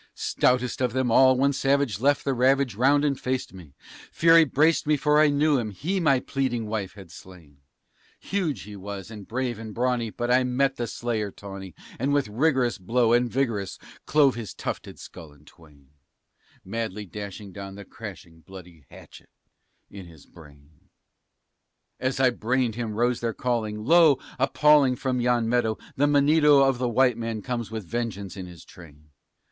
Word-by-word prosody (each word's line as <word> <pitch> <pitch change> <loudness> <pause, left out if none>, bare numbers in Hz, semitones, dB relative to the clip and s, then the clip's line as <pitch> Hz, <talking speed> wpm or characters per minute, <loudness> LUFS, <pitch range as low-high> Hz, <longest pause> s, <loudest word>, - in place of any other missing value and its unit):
Stoutest 125 0 0
of 125 -2 0
them 130 -2 0
all, 130 +2 +5
one 140 +2 +2
savage 135 -4 0
left 140 +3 +1
the 135 - +1
ravage 130 0 +2
round 140 +7 +3
and 140 -2 0
faced 130 -4 -3
me; 80 -7 -14 0.4
Fury 165 0 +5
braced 155 +3 +2
me, 150 -1 +3
for 150 +1 +2
I 155 - +5
knew 145 0 +2
him 110 -3 -3
he 165 - -3
my 140 -6 +3
pleading 125 -4 -2
wife 105 -3 -4
had 95 -5 -13
slain. 85 -5 -15 0.6
Huge 180 -8 -3
he 105 +1 -10
was, 100 +1 -8
and 105 -3 -10
brave 125 -2 -3
and 110 -2 -8
brawny, 125 -1 0
but 120 +3 -3
I 130 +1 +4
met 125 +2 0
the 120 - -3
slayer 115 -3 -3
tawny, 95 -2 -10 0.2
And 135 +4 0
with 140 -6 +1
rigorous 125 -1 +1
blow, 115 +4 +1
and 120 0 +2
vigorous, 115 -7 -2 0.3
clove 145 -3 +4
his 115 -3 -7
tufted - - -6
skull 80 -3 -12
in 75 +1 -23
twain 75 -4 -20 0.8
Madly 105 0 -4
dashing 100 +1 -8
down 100 0 -9
the 100 0 -10
crashing 90 -6 -11
bloody 90 -3 -14
hatchet - - -15 0.6
in 95 -3 -10
his 80 -4 -16
brain. 75 -2 -19 1.1
As 130 0 -2
I 130 -1 +4
brained 120 0 -1
him 115 -2 -4
rose 120 +2 +1
their 115 -2 -3
calling, 110 -4 -2
"Lo! 160 -2 +5 0.2
appalling 140 0 +4
from 125 0 -2
yon 120 -1 +1
meadow 115 -2 0 0.2
The 145 +2 +2
Monedo 145 -1 +4
of 135 -2 0
the 125 -1 0
white 125 0 +2
man 115 -2 -4
comes 120 -3 -4
with 110 -3 -6
vengeance 105 -3 -4
in 95 -2 -7
his 85 -2 -13
train!" 75 -3 -16
120 Hz, 175 wpm, -25 LUFS, 100-135 Hz, 1.1 s, all